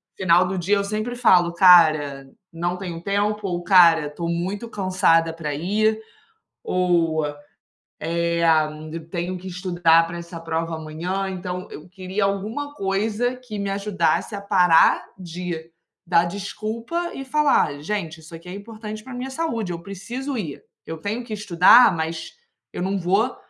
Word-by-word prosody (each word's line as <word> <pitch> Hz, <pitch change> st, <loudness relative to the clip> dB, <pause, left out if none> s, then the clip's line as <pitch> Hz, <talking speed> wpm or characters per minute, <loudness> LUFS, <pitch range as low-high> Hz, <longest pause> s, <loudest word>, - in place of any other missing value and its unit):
final 180 Hz, 0 st, +3 dB
do 190 Hz, +1 st, -3 dB
dia, 200 Hz, +3 st, +1 dB
sempre 215 Hz, +4 st, -3 dB
falo: 180 Hz, -8 st, +4 dB
"Cara, 155 Hz, -6 st, +5 dB, 0.2 s
não 175 Hz, +2 st, -2 dB
tenho 175 Hz, -3 st, -6 dB
tempo, 205 Hz, +1 st, -1 dB
ou 175 Hz, -1 st, -2 dB
cara, 170 Hz, -5 st, +6 dB
estou 170 Hz, +3 st, -5 dB
muito 190 Hz, +7 st, -3 dB
cansada 185 Hz, -5 st, +2 dB
para 155 Hz, -3 st, -4 dB
ir, 215 Hz, +8 st, 0 dB, 0.6 s
ou, 170 Hz, -4 st, +1 dB, 0.7 s
eh, 170 Hz, +1 st, -1 dB, 0.7 s
tenho 175 Hz, +1 st, -3 dB
que 185 Hz, -, -10 dB
estudar 175 Hz, -2 st, +2 dB
para 170 Hz, +1 st, -7 dB
essa 170 Hz, 0 st, -9 dB
prova 165 Hz, 0 st, -3 dB
amanhã". 165 Hz, +5 st, -4 dB
Então, 180 Hz, -1 st, -5 dB
eu 155 Hz, -, -10 dB
queria 190 Hz, +2 st, -2 dB
alguma 215 Hz, +9 st, -3 dB
coisa 215 Hz, +4 st, -1 dB
que 250 Hz, -4 st, -9 dB
me 200 Hz, -1 st, -3 dB
ajudasse 200 Hz, 0 st, 0 dB
a 200 Hz, -, -6 dB
parar 180 Hz, -5 st, +4 dB
de 175 Hz, -2 st, -6 dB, 0.3 s
dar 170 Hz, 0 st, +3 dB
desculpa 220 Hz, -, -4 dB
e 270 Hz, -, -6 dB
falar: 270 Hz, -, +1 dB
"Gente, 170 Hz, -3 st, -4 dB
isso 160 Hz, +1 st, -12 dB
aqui 170 Hz, +2 st, -12 dB
é -, -, -6 dB
importante 215 Hz, +1 st, -8 dB
para 260 Hz, -, -10 dB
minha 250 Hz, +2 st, -5 dB
saúde. 265 Hz, -, -3 dB
Eu 170 Hz, -, -5 dB
preciso 240 Hz, +9 st, -6 dB
ir, 160 Hz, -10 st, -5 dB, 0.2 s
eu 160 Hz, -, -6 dB
tenho 210 Hz, +9 st, -4 dB
que 235 Hz, -2 st, -7 dB
estudar, 205 Hz, +2 st, +6 dB
mas 160 Hz, 0 st, -4 dB, 0.4 s
eu -, -, -5 dB
não 195 Hz, +2 st, -1 dB
vou 195 Hz, +7 st, +1 dB
185 Hz, 150 wpm, -22 LUFS, 170-210 Hz, 0.7 s, cara